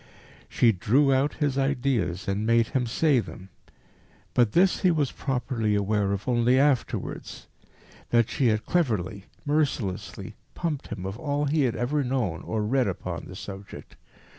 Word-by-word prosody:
She 120 Hz, -, +4 dB
drew 130 Hz, +9 st, +3 dB
out 135 Hz, +2 st, +1 dB
his 140 Hz, -3 st, 0 dB
ideas 125 Hz, -9 st, 0 dB
and 100 Hz, +2 st, -1 dB
made 115 Hz, 0 st, +3 dB
him 130 Hz, -4 st, 0 dB
say 140 Hz, +3 st, +3 dB
them. 95 Hz, -4 st, -8 dB, 0.8 s
But 120 Hz, -4 st, +3 dB
this 180 Hz, +2 st, +4 dB
he 185 Hz, -, +3 dB
was 150 Hz, -6 st, +1 dB
properly 125 Hz, -5 st, -1 dB
aware 100 Hz, 0 st, +1 dB
of 100 Hz, +3 st, -3 dB
only 125 Hz, +1 st, +3 dB
afterwards 135 Hz, -2 st, -1 dB, 0.6 s
that 115 Hz, -2 st, +3 dB
she 130 Hz, -1 st, +1 dB
had 110 Hz, -1 st, +1 dB
cleverly, 105 Hz, -, -1 dB, 0.2 s
mercilessly 145 Hz, -10 st, -2 dB, 0.2 s
pumped 155 Hz, -5 st, -3 dB
him 90 Hz, -, -6 dB
of 95 Hz, +4 st, -5 dB
all 145 Hz, 0 st, -1 dB
he 145 Hz, 0 st, +2 dB
had 120 Hz, -, 0 dB
ever 140 Hz, +4 st, 0 dB
known 125 Hz, -10 st, -1 dB
or 110 Hz, -1 st, -2 dB
read 125 Hz, +2 st, +1 dB
upon 95 Hz, -, -4 dB
the -, -, -9 dB
subject. 100 Hz, 0 st, -9 dB
125 Hz, 155 wpm, -26 LUFS, 105-140 Hz, 0.8 s, She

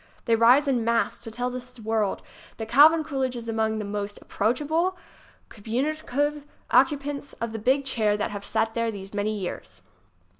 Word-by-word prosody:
They 230 Hz, -, +3 dB
rise 245 Hz, +6 st, +5 dB
en 250 Hz, -4 st, +1 dB
masse 230 Hz, 0 st, +1 dB
to -, -, -8 dB
tell 245 Hz, +3 st, -3 dB
the 250 Hz, -1 st, -8 dB
world 220 Hz, -2 st, 0 dB, 0.3 s
that 220 Hz, -, -5 dB
Calvin 310 Hz, +7 st, +6 dB
Coolidge 265 Hz, -4 st, -2 dB
is 235 Hz, -1 st, -7 dB
among 220 Hz, -1 st, 0 dB
the 210 Hz, -, -3 dB
most 205 Hz, 0 st, -4 dB
ap -, -, -20 dB
proachable, 305 Hz, -, 0 dB, 0.5 s
communicative 290 Hz, +5 st, -2 dB, 0.3 s
occupants 280 Hz, +1 st, +1 dB
of 230 Hz, -1 st, -4 dB
the 225 Hz, -, -5 dB
big 265 Hz, +5 st, +2 dB
chair 215 Hz, -5 st, +1 dB
that 210 Hz, -, -2 dB
have 205 Hz, -1 st, -6 dB
sat 225 Hz, +2 st, 0 dB
there 230 Hz, 0 st, 0 dB
these 195 Hz, -2 st, -8 dB
many 210 Hz, +1 st, -1 dB
years. 185 Hz, -3 st, -7 dB
235 Hz, 175 wpm, -25 LUFS, 220-280 Hz, 0.5 s, Calvin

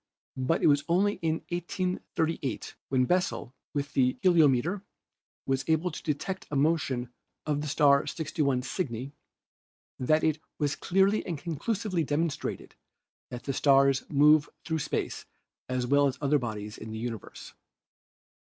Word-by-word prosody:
But 130 Hz, +6 st, 0 dB
it -, -, +5 dB
was 145 Hz, -1 st, +4 dB
only 200 Hz, +4 st, +2 dB
in 160 Hz, -1 st, -1 dB
1838 175 Hz, -, -2 dB, 0.2 s
when 130 Hz, -1 st, +3 dB
Bessel 180 Hz, -6 st, 0 dB, 0.2 s
with 145 Hz, -1 st, -3 dB
the 130 Hz, -1 st, +2 dB
heliometer 170 Hz, +1 st, +4 dB, 0.6 s
was 135 Hz, 0 st, 0 dB
able 160 Hz, +2 st, +1 dB
to -, -, -7 dB
detect 175 Hz, +5 st, -3 dB
a 150 Hz, -, -3 dB
motion 135 Hz, -5 st, +1 dB, 0.3 s
of 145 Hz, -1 st, 0 dB
the 150 Hz, -, -4 dB
star 145 Hz, -1 st, +4 dB
61 145 Hz, -5 st, -1 dB
Cygni 130 Hz, -, -4 dB, 0.9 s
that 155 Hz, +5 st, +2 dB
it 155 Hz, -1 st, +2 dB, 0.2 s
was 145 Hz, -2 st, 0 dB
clearly 195 Hz, +6 st, +2 dB
and 170 Hz, -4 st, -4 dB
conclusively 175 Hz, +4 st, -2 dB
demonstrated 150 Hz, +1 st, -2 dB, 0.6 s
that 125 Hz, -, -7 dB
the 135 Hz, -, -2 dB
stars 135 Hz, 0 st, +4 dB
move 150 Hz, +1 st, +5 dB, 0.2 s
through 160 Hz, -1 st, -1 dB
space -, -, -3 dB, 0.4 s
as 125 Hz, -1 st, 0 dB
well 140 Hz, +2 st, +4 dB
as 130 Hz, -1 st, -3 dB
other 145 Hz, 0 st, +2 dB
bodies 105 Hz, -3 st, -5 dB
in 110 Hz, -, -8 dB
the 110 Hz, -, -5 dB
universe. 115 Hz, -1 st, -6 dB
145 Hz, 140 wpm, -28 LUFS, 135-165 Hz, 0.9 s, it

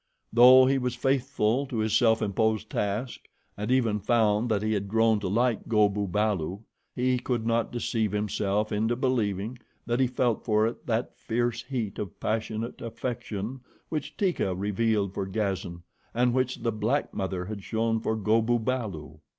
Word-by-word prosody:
Though 130 Hz, +2 st, +8 dB
he 135 Hz, +1 st, +2 dB
was 125 Hz, -1 st, -2 dB
faithful 135 Hz, -1 st, +1 dB
to 125 Hz, -, -4 dB
his 110 Hz, -1 st, +1 dB
self 110 Hz, -3 st, +4 dB
imposed 110 Hz, +1 st, 0 dB
task, 105 Hz, +5 st, -2 dB, 0.4 s
and 105 Hz, +2 st, -4 dB
even 120 Hz, -5 st, +2 dB
found 110 Hz, +1 st, +2 dB
that 105 Hz, -2 st, +1 dB
he 110 Hz, 0 st, +1 dB
had 100 Hz, -1 st, -2 dB
grown 110 Hz, +1 st, +3 dB
to 100 Hz, -, -3 dB
like 115 Hz, +4 st, +1 dB
Go 105 Hz, -2 st, +4 dB
bu 100 Hz, 0 st, -2 dB
balu, 100 Hz, -1 st, -1 dB, 0.3 s
he 125 Hz, 0 st, +1 dB
could 120 Hz, -2 st, -2 dB
not 115 Hz, 0 st, +1 dB
deceive 115 Hz, -3 st, -1 dB
himself 105 Hz, 0 st, -1 dB
into 110 Hz, +3 st, +1 dB
believing 120 Hz, -3 st, -1 dB, 0.3 s
that 120 Hz, +1 st, 0 dB
he 130 Hz, -, +4 dB
felt 120 Hz, -2 st, 0 dB
for 110 Hz, -1 st, +2 dB
it 115 Hz, -, -4 dB
that 115 Hz, +1 st, -1 dB
fierce 120 Hz, 0 st, -1 dB
heat 115 Hz, -8 st, -4 dB
of 100 Hz, -3 st, -6 dB
passionate 110 Hz, +1 st, -3 dB
affection 120 Hz, 0 st, -4 dB, 0.3 s
which 155 Hz, -3 st, -4 dB
Teeka 175 Hz, -, 0 dB
revealed 105 Hz, 0 st, 0 dB
for 95 Hz, -, -3 dB
Gazan, 95 Hz, -4 st, -3 dB, 0.3 s
and 120 Hz, 0 st, +3 dB
which 130 Hz, -2 st, -1 dB
the 115 Hz, -, +1 dB
black 110 Hz, +7 st, -1 dB
mother 95 Hz, -2 st, -3 dB
had 100 Hz, 0 st, -6 dB
shown 115 Hz, +1 st, 0 dB
for 110 Hz, 0 st, -1 dB
Go 110 Hz, +1 st, +2 dB
bu 120 Hz, +2 st, +2 dB
balu. 105 Hz, -, -4 dB
110 Hz, 170 wpm, -27 LUFS, 105-120 Hz, 0.4 s, Though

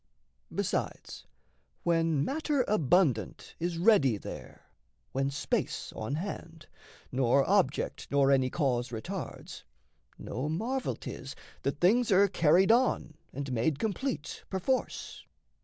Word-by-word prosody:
Besides, -, -, -3 dB, 0.6 s
when 165 Hz, -4 st, +2 dB
matter 290 Hz, -2 st, 0 dB
abundant 150 Hz, -, +1 dB
Is 170 Hz, 0 st, -2 dB
ready 165 Hz, -, +4 dB
there, -, -, -9 dB, 0.5 s
when 135 Hz, +1 st, 0 dB
space 140 Hz, 0 st, -2 dB
on 110 Hz, +6 st, -3 dB
hand, 165 Hz, -2 st, -6 dB, 0.5 s
nor 130 Hz, +1 st, +3 dB
object 190 Hz, -8 st, +1 dB
Nor 140 Hz, -1 st, +3 dB
any 130 Hz, -2 st, +3 dB
cause 130 Hz, -5 st, 0 dB
retards, 110 Hz, -2 st, -6 dB, 0.6 s
no 130 Hz, +7 st, -4 dB
marvel 240 Hz, +11 st, -1 dB
'tis -, -, -8 dB, 0.3 s
That -, -, -2 dB
things 225 Hz, +6 st, +4 dB
are 200 Hz, +1 st, +6 dB
carried 180 Hz, +2 st, +4 dB
on 240 Hz, -9 st, +2 dB, 0.2 s
and 140 Hz, 0 st, -5 dB
made 125 Hz, +5 st, +1 dB
complete, 220 Hz, -, -3 dB
Perforce. 195 Hz, +8 st, -2 dB
165 Hz, 110 wpm, -30 LUFS, 135-200 Hz, 0.6 s, are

